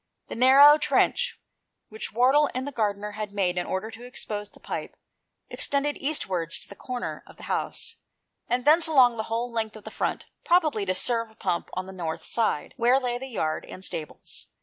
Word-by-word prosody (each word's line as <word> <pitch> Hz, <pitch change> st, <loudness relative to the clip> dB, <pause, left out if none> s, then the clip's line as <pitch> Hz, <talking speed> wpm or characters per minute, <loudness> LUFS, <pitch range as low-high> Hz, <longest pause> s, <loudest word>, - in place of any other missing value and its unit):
The -, -, -5 dB
narrow 275 Hz, +5 st, +8 dB
trench -, -, +1 dB, 0.5 s
which 220 Hz, +1 st, -6 dB
Wardle 265 Hz, +6 st, +4 dB
and 255 Hz, +1 st, -2 dB
the -, -, -4 dB
gardener 210 Hz, -3 st, -1 dB
had 210 Hz, 0 st, -5 dB
made 185 Hz, -3 st, 0 dB
in 180 Hz, -, -2 dB
order 190 Hz, +4 st, -3 dB
to 225 Hz, +2 st, -11 dB
expose 210 Hz, -4 st, -5 dB
the -, -, -19 dB
pipe, -, -, -6 dB, 0.5 s
extended 285 Hz, +1 st, -1 dB
eastwards 185 Hz, -, -1 dB
to -, -, -4 dB
the -, -, -10 dB
corner 250 Hz, +2 st, -5 dB
of -, -, -16 dB
the -, -, -12 dB
house, -, -, -3 dB, 0.5 s
and 245 Hz, +1 st, 0 dB
thence 320 Hz, +3 st, +7 dB
along 255 Hz, -6 st, +5 dB
the 220 Hz, -, -1 dB
whole 235 Hz, +2 st, -2 dB
length 225 Hz, -2 st, -2 dB
of 215 Hz, -, -11 dB
the -, -, -8 dB
front, -, -, -2 dB, 0.2 s
probably 310 Hz, -, +2 dB
to 185 Hz, -, +1 dB
serve 230 Hz, +3 st, 0 dB
a 220 Hz, -, -22 dB
pump 175 Hz, -5 st, -2 dB
on 185 Hz, +1 st, -3 dB
the 190 Hz, -, -9 dB
north 165 Hz, -3 st, -4 dB
side, 225 Hz, -10 st, -1 dB
where 245 Hz, +3 st, +4 dB
lay 245 Hz, -2 st, -2 dB
the 265 Hz, -, -6 dB
ja^A 155 Hz, -4 st, -1 dB
and 185 Hz, -, -4 dB
stables. 155 Hz, -, -6 dB
230 Hz, 195 wpm, -26 LUFS, 200-265 Hz, 0.5 s, narrow